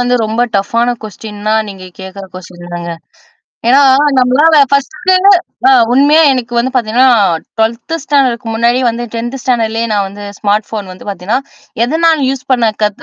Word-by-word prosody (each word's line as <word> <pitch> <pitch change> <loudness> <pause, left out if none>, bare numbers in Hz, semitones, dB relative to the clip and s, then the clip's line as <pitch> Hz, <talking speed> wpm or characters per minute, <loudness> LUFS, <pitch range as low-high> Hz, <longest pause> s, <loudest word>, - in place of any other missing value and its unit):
வந்து 245 0 +1
ரொம்ப 220 +2 -2 0.2
டஃப்பான 230 +5 0
கொஸ்டின்னா 215 0 -5
நீங்க 190 -2 -10 0.2
கேட்கற 190 +1 -9
கொஸ்டின் 175 -1 -11
தாங்க. 170 0 -5 0.8
ஏன்னா 270 +3 +5 0.4
நம்மளால 285 +6 +4
ஃபர்ஸ்ட்டு 280 +6 0 0.6
அ - - +6 0.2
உண்மையா 285 +5 +4
எனக்கு 250 -2 -4
வந்து 245 +2 0
பார்த்தீங்கன்னா, 245 +1 +2 0.5
12த் 230 +7 -1
ஸ்டாண்டர்ட்க்கு 260 -6 0
முன்னாடி 235 +2 +1
வந்து 235 +1 -3
10த் 240 +3 -4
ஸ்டாண்டர்ட்லேயே 230 -2 -1
நான் 200 -1 0
வந்து 205 +1 -11 0.2
ஸ்மார்ட் 210 0 0
ஃபோன் 210 -3 -5
வந்து 185 - -13
பார்த்தீங்கன்னா, 200 +5 -2 0.4
எதனால் 320 +3 +1
யூஸ் 265 -1 -3
பண்ண 240 -3 +2 0.2
கத் 210 -1 -1
235 Hz, 145 wpm, -12 LUFS, 205-260 Hz, 0.8 s, அ